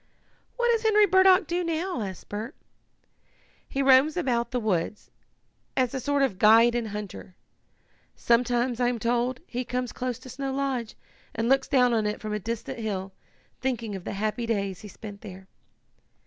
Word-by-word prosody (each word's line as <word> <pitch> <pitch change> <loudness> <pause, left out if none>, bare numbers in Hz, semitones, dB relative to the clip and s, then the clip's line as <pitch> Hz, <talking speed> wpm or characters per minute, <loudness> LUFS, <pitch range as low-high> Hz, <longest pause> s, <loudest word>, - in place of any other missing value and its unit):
"What 480 -1 +2
does 460 -1 +1
Henry 425 -2 +5
Burdock 375 0 +5
do 350 +3 -1
now?" 335 -3 -2
asked 190 -3 -6
Bert. 220 +7 -6 1.1
"He 275 - -1
roams 270 +4 +5
about 240 -8 0
the 250 - -1
woods, 210 -2 -2 0.7
as 255 -2 +1
a 265 - -2
sort 285 +2 +1
of 200 -9 -1
guide 230 +2 +6
and 240 -2 -1
hunter. 205 -3 -7 0.8
Sometimes, 240 +1 +1
I 245 - +2
am 245 -1 0
told, 240 +2 0
he 250 -4 -4
comes 250 0 -3
close 250 -2 -3
to 255 - -13
Snow 270 +2 -4
Lodge 265 -5 -2 0.4
and 225 +1 -1
looks 270 +1 +3
down 250 -3 +3
on 220 -2 +1
it 210 - -3
from 215 -1 -5
a 210 - -1
distant 230 +3 -5
hill, 195 -3 -4 0.5
thinking 235 -5 -2
of 190 - -7
the - - -5
happy 215 +3 -2
days 200 -5 -2
he 210 - -9
spent 205 0 -10
there." 190 -2 -10
240 Hz, 175 wpm, -26 LUFS, 215-270 Hz, 1.1 s, guide